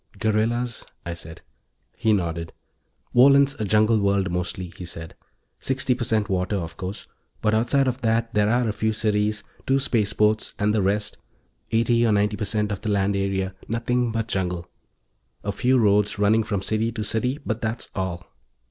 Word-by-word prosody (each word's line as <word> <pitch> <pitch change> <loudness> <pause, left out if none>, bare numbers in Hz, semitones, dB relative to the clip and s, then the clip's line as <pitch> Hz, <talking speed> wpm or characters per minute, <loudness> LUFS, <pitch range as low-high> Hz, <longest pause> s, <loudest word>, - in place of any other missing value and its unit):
"Guerrillas," 110 +3 0 0.2
I 85 - -3
said. 80 -1 -10 0.6
He 110 - +2
nodded. 85 -4 -1 0.6
"Wohlen's 140 +2 +6
a - - 0
jungle 110 +2 +3
world, 100 -2 +1
mostly," 90 0 -3
he - - -8
said. 80 -1 -7 0.5
"Sixty 130 -1 0
per 120 0 -3
cent 110 -2 +1
water, 95 +1 0
of 85 -6 -4
course, 95 +2 -6 0.3
but 105 0 +1
outside 120 +5 +2
of 130 +1 -2
that 115 0 +1
there 105 0 +3
are 120 +1 +2
a 105 - 0
few 110 +1 0
cities, 105 -1 0 0.2
two 135 - +4
spaceports, 105 -4 +1
and 105 0 +1
the 110 - +2
rest 105 +2 -1 0.5
eighty 115 +1 +3
or 115 - +3
ninety 105 +1 +2
per 105 +1 -3
cent 105 +1 0
of 100 - -4
the 110 - -3
land 100 0 +1
area 95 -1 -1
nothing 120 +1 0
but 115 0 -2
jungle. 90 -4 -2 0.8
A 100 - -1
few 130 +5 +2
roads 105 -2 +3
running 105 +2 +3
from 105 -3 -2
city 110 +3 0
to 110 - -3
city, 120 +6 0
but 115 -1 -2
that's 110 +1 -2
all." 90 -2 -3
105 Hz, 175 wpm, -24 LUFS, 100-115 Hz, 0.8 s, Wohlen's